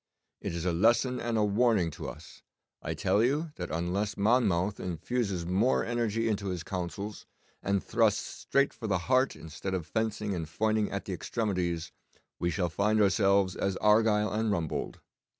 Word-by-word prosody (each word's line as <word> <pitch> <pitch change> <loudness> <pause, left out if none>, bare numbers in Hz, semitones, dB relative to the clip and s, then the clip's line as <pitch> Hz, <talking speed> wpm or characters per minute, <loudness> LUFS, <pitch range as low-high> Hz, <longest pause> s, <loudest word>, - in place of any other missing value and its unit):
It - - -3
is 85 +1 -3
a 90 - +2
lesson 120 +7 +3
and 120 -1 -1
a 105 - +3
warning 105 -4 +2
to - - -6
us. - - -12 0.4
I - - -3
tell 105 - +2
you 150 +6 0
that 90 -1 -4
unless 90 +5 -1
Monmouth 100 -3 +2
infuses 95 +1 -2
more 100 +9 +2
energy 115 -1 0
into 105 -2 -1
his 90 -3 -3
councils, 95 +4 -5 0.3
and 100 0 0
thrusts - - +2
straight 140 0 0
for 110 - -6
the 100 -2 +2
heart 130 +1 +3
instead 80 +4 -5
of 90 -4 -3
fencing 105 +3 -2
and 85 -3 -3
foining 110 +3 +1
at 100 - -4
the 95 - -4
extremities, 90 -4 -2 0.5
we 85 - +1
shall 85 +1 0
find 105 +5 +1
ourselves 100 -2 +3
as 95 -1 -1
Argyle 105 0 +3
and 110 0 0
Rumbold. 85 -5 -2
100 Hz, 170 wpm, -29 LUFS, 90-110 Hz, 0.5 s, lesson